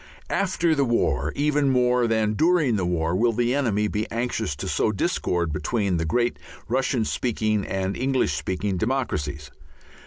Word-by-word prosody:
After 175 -4 +1
the 140 -2 +2
war 85 - +1
even 145 -1 +2
more 125 -1 +3
than 110 -1 +1
during 155 -2 +3
the 95 -4 0
war 85 -1 0
will 115 +4 +2
the 120 +2 +1
enemy 110 -7 +1
be 105 +2 -3
anxious 115 -10 -2
to - - -6
sow - - +1
discord 90 - -1
between 100 +1 0
the 80 - -1
great 120 +8 0 0.3
Russian 130 -3 0
speaking 110 -3 -1
and 95 0 -2
English 130 +1 +1
speaking 95 +1 -2
democracies. 85 - -2
115 Hz, 155 wpm, -24 LUFS, 95-130 Hz, 0.3 s, more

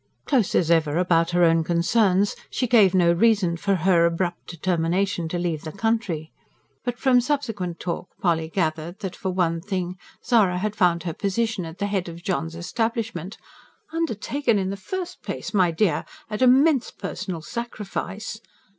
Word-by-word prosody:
Close 250 -9 +1
as 170 -2 +3
ever 160 -2 +3
about 170 -2 +3
her 175 0 +3
own 165 -1 +4
concerns, 185 +4 +2
she 255 - -1
gave 215 -6 +5
no 170 -2 +5
reason 195 -2 +3
for 195 +3 0
her 170 -1 +4
abrupt 175 +1 -2
determination 175 +1 0
to 175 - -2
leave 170 -3 -2
the 155 - -6
country; 205 -8 -1 0.5
but 245 -1 -3
from 250 -2 +4
subsequent 225 - -2
talk 175 0 -4
Polly 165 -3 +1
gathered 160 0 -2
that, 190 -3 -4
for 190 - -3
one 170 -3 0
thing, 185 -2 -3 0.3
Zara 215 -7 +3
had 210 +3 -2
found 175 -3 +2
her 170 -3 -3
position 200 0 -1
at 165 +1 -9
the 200 - -1
head 195 -3 -1
of 170 +1 -10
John's 165 -3 -2
establishment 215 +1 -3 0.6
"Undertaken 280 -5 0
in 190 -1 -1
the - - -3
first 355 - -6
place, - - -5
my 185 -4 +4
dear, 165 -2 +1 0.3
at 210 - -3
immense 265 +2 +5
personal 185 -4 -5
sacrifice!" 215 -1 -5
185 Hz, 165 wpm, -24 LUFS, 170-220 Hz, 0.6 s, gave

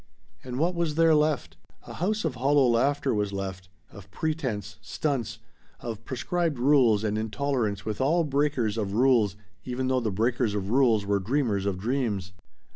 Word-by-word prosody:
And 125 -1 -6
what 170 +5 +1
was 170 -3 -1
there 165 0 +5
left? 150 - +1 0.3
A - - -9
house 210 +3 -1
of 155 - 0
hollow 135 +3 +3
laughter 135 +4 +1
was 105 -2 -1
left 95 -1 -5 0.2
of 100 -1 -13
pretense 110 - -3
"stunts" 135 -7 -2 0.4
of 115 -2 -6
prescribed 165 +3 -1
rules 120 -5 +4
and 105 0 -1
intolerance 110 -2 -2
with 110 +2 -3
all 165 +6 +3
breakers 140 -7 0
of 100 -2 -2
rules 115 -4 +3 0.3
even 130 +1 -2
though 130 -1 +2
the 115 -3 -1
breakers 115 +2 0
of 100 0 -3
rules 120 -5 +3
were 100 0 +1
dreamers 105 -2 0
of 95 -2 -1
dreams. 105 -3 -2
120 Hz, 165 wpm, -27 LUFS, 105-145 Hz, 0.4 s, there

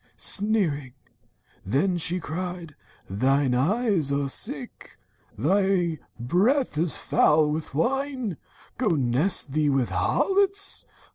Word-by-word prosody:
Sneering 180 - +1 0.7
then, 145 - 0
she 175 +1 +2
cried: 175 -1 -6 0.3
'Thine 130 +6 +1
eyes 175 - +1
are 140 -1 -1
sick! - - -3 0.4
Thy 180 - +1 0.2
breath 205 - +1
is 160 +1 0
foul 150 0 +2
with 155 -2 -5
wine! 255 - -1 0.4
Go 250 - 0
nest 135 +4 +2
thee 150 +1 +1
with 135 -3 0
thy - - -3
harlots! 395 0 +1
165 Hz, 110 wpm, -25 LUFS, 140-205 Hz, 0.7 s, she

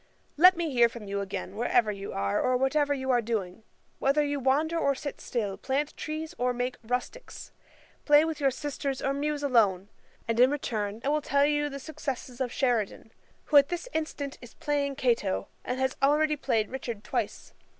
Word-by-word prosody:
] - - -39
'Let 365 +3 +7
me 335 -3 -1
hear 240 -2 +5
from 230 -3 -9
you 200 0 -2
again, 195 0 -5
wherever 235 -1 +2
you 200 -1 -6
are, 100 0 0
or 255 0 +2
whatever 285 +3 +1
you 265 -2 0
are 245 -1 +3
doing; 215 -4 -3 0.4
whether 280 +2 +3
you 285 -1 -1
wander 285 +5 +1
or 280 -4 +2
sit 285 +1 -6
still, 205 -5 -2
plant 285 +3 -1
trees 315 +2 -5
or 250 0 +1
make 245 0 -2
Rusticks, 250 - -5 0.5
play 295 +1 +6
with 320 -2 -3
your 275 -2 +3
sisters 275 0 -4
or 275 - +1
muse 290 +1 -2
alone; 205 -8 +2 0.4
and 230 0 0
in 250 +1 +7
return 220 -7 -3
I 275 - 0
will 300 +1 +1
tell 280 0 +2
you 295 0 +1
the 275 - -6
success 270 -3 -6
of 255 -3 -1
Sheridan, 235 -5 -1 0.3
who 295 - +4
at 280 +1 +6
this 350 +6 -4
instant 300 -3 -3
is 245 -2 -13
playing 285 -2 -1
Cato, 230 -7 0
and 250 +1 -3
has 265 0 0
already 300 +2 +3
played 230 -7 0
Richard 235 -5 -5
twice. - - -3
265 Hz, 190 wpm, -28 LUFS, 235-290 Hz, 0.5 s, Let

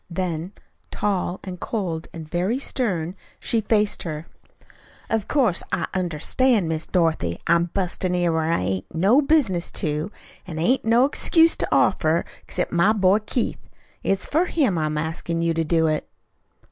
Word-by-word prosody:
Then, 175 0 -3 0.4
tall, 190 -3 -1
and 180 -2 -7
cold, 180 -7 -3
and 160 -2 -8
very 180 +9 0
stern, 190 - -1 0.3
she 230 - 0
faced 210 -1 +1
her. 155 -2 -5 0.9
"Of 220 -3 0
course, 240 - +2
I - - 0
understand, 185 - +1
Miss 160 0 -2
Dorothy, 160 - 0
I'm 170 +1 +3
bustlin' 180 0 -2
in 175 -2 +1
where 160 0 0
I - - +2
hain't 95 - -3
no 200 - +4
business 265 - +2
to. 155 +5 -1 0.4
An' 165 -3 -6
I - - -2
hain't 255 +8 +2
no 230 +3 +5
excuse 325 +3 +4
to - - -1
offer 160 +1 +2 0.2
except 180 - -3
my 180 +5 +4
boy, 195 -1 +3
Keith. 220 +3 -2 0.4
It's 195 0 0
for 325 +5 +1
him 280 - +1
I'm 155 -1 -1
askin' 165 +2 -2
you 165 0 +2
to 165 0 0
do 160 +1 +2
it." 155 -1 -1
180 Hz, 160 wpm, -23 LUFS, 160-215 Hz, 0.9 s, no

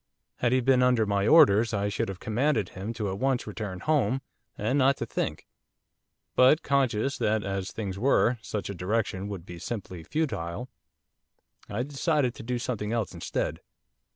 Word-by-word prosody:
Had 120 - +1
he 130 0 +3
been 130 0 +4
under 125 -3 +4
my 100 0 +1
orders 115 -7 +6
I 100 0 0
should 100 -1 -2
have 95 -1 -6
commanded 115 -2 0
him 95 +4 -5
to 110 -3 -3
at 95 - -5
once 135 -2 +1
return 100 -3 -5
home, 135 -4 +1 0.3
and 120 +7 +1
not 135 +1 +4
to - - -3
think; - - -3 0.9
but 130 +5 +5
conscious 135 -2 +1
that, 110 0 +1
as 95 -1 -3
things 100 -3 -5
were, 125 -1 +3
such 105 -2 -4
a - - -5
direction 95 +1 -1
would 95 -4 -6
be 85 -1 -9
simply 95 -4 -5
futile, 125 - -3 1.0
I 105 +4 -1
decided 145 -2 0
to - - -10
do 125 +2 -2
something 115 -4 -3
else 115 -6 -1
instead. - - -3
115 Hz, 170 wpm, -27 LUFS, 100-130 Hz, 1.0 s, orders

